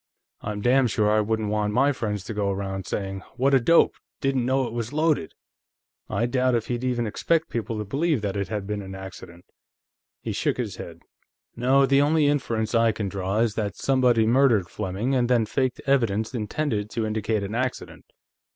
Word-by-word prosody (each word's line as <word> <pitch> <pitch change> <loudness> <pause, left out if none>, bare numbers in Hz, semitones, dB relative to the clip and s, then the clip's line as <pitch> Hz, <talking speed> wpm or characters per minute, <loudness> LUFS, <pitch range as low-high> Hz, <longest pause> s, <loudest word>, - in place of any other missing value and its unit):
I'm 105 -1 -4
damn 125 +3 +4
sure 105 -2 +1
I 110 0 +3
wouldn't 110 0 -1
want 105 -1 0
my 135 +5 +4
friends 105 -7 -3
to 110 - -6
go 105 -1 -1
around 95 -1 -3
saying: 95 -1 -3 0.2
'What 135 +2 +2
a 135 - +6
dope; 165 +8 +4 0.3
didn't 135 -3 0
know 130 0 +2
it 115 - -6
was 120 0 -3
loaded!' 155 - 0 0.7
I 120 - 0
doubt 125 0 +1
if 115 - -2
he'd 120 0 -2
even 125 -2 0
expect 160 +9 0
people 115 -1 -3
to 105 - -3
believe 140 - 0
that 100 -1 -2
it 100 -1 -2
had 105 -3 -4
been 105 0 -3
an 95 -1 -8
accident." 95 -2 -10 0.7
He - - -4
shook - - -1
his - - -4
head. - - -9 0.5
"No, 130 +3 +4
the 135 +1 +4
only 150 +1 +3
inference 120 -7 0
I 115 -1 +4
can 105 -2 -3
draw 95 +2 -1
is 115 -3 +1
that 105 -3 -3
somebody 125 -4 +3
murdered 115 -6 +3
Fleming, 105 +6 -2
and 125 -2 +1
then 120 -3 +3
faked 130 +3 -1
evidence 115 -5 +1
intended 110 -1 -2
to 115 -1 -2
indicate 110 -1 -1
an 100 +2 -5
accident." 125 +2 -3
115 Hz, 195 wpm, -25 LUFS, 105-130 Hz, 0.7 s, a